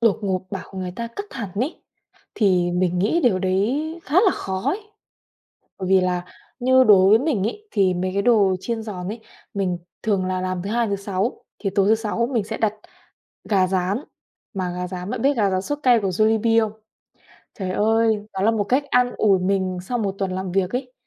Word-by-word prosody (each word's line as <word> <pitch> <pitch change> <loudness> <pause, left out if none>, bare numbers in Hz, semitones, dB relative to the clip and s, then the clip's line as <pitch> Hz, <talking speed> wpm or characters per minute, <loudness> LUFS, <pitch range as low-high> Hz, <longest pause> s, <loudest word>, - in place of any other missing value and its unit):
đột 230 -4 +3
ngột 190 -2 0
bảo 195 - -6
người 185 -1 -3
ta 235 - -3
cắt 405 - -3
hẳn 225 -7 -5
ấy, 255 - -3 0.5
thì 180 -4 +2
mình 180 0 +1
nghĩ 220 - +2
điều 210 -7 +3
đấy 245 - -1
khá 295 - -6
là 380 - +5
khó 190 -1 -4
ấy. 365 +10 0 1.0
Bởi 185 -2 -4
vì 190 -1 +5
là 180 -1 -1 0.3
như 260 +1 +5
đối 195 -4 +6
với 220 +2 +6
mình 265 -9 0
ấy, 425 - -7
thì 195 -4 +2
mấy 185 +1 -2
cái 200 - +1
đồ 200 -4 +4
chiên 225 +3 -3
giòn 185 -5 -6
ấy, 220 +4 -5 0.3
mình 185 -3 -1 0.3
thường 200 -4 +1
là 185 0 -1
làm 185 -1 -2
thứ 195 - -5
Hai, 235 0 +1
thứ 200 - 0
Sáu, 200 +3 -3
thì 200 - -1
tối 200 0 +3
thứ 220 - +5
Sáu 225 +2 -1
mình 230 -4 +1
sẽ 200 - -5
đặt 215 -2 +1 0.8
gà 190 -3 +3
rán. 190 +3 0 0.6
Mà 185 -2 -2
gà 180 0 -3
rán 180 +2 -6
bạn 250 -3 -3
biết 280 0 +3
gà 205 -4 +2
rán 185 0 0
sốt 290 +7 -3
cay 245 -4 +5
của 195 - -1
Jollibee 220 +4 +3
không? - - -12 0.9
Trời 190 -2 -3
ơi, 220 +1 +2
đó 190 - -4
là 215 - +4
một 220 -2 0
cách 260 +7 +1
an 250 0 +3
ủi 195 -3 +4
mình 185 0 0
sau 245 +6 -3
một 200 -3 -1
tuần 195 -2 -1
làm 185 -1 -4
việc 185 -1 +1
ấy. 250 0 -4
200 Hz, 215 wpm, -22 LUFS, 185-230 Hz, 1.0 s, đối